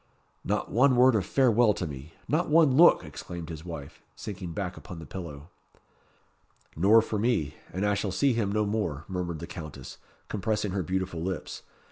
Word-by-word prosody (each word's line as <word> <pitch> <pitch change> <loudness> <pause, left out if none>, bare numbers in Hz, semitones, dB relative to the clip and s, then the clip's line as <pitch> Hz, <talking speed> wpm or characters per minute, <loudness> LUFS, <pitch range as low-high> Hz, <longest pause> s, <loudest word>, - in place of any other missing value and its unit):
"Not - - -2
one 130 +3 +4
word 125 +1 +6
of 100 -5 0
farewell 120 -4 +4
to 90 - -3
me! 70 +1 -8
not 155 +7 +1
one 155 -4 +5
look!" 170 +4 +7
exclaimed 85 -1 -8
his 80 -2 -7
wife, 80 -5 -8
sinking 95 -4 -6
back 95 -2 -3
upon 90 - -9
the 80 - -8
pillow. 75 -1 -8 1.2
"Nor 105 +7 +5
for 110 -2 -3
me 100 - +1 0.2
and 95 +3 -2
I 105 - +2
shall 100 -1 -1
see 135 +8 +2
him 110 -4 0
no 105 0 +1
more," 100 -8 -2
murmured 90 -3 -3
the 85 - -6
Countess, 75 -6 -9 0.3
compressing 105 0 -1
her 95 0 -1
beautiful 90 -1 -2
lips. 95 +1 -4
95 Hz, 175 wpm, -28 LUFS, 85-110 Hz, 1.2 s, look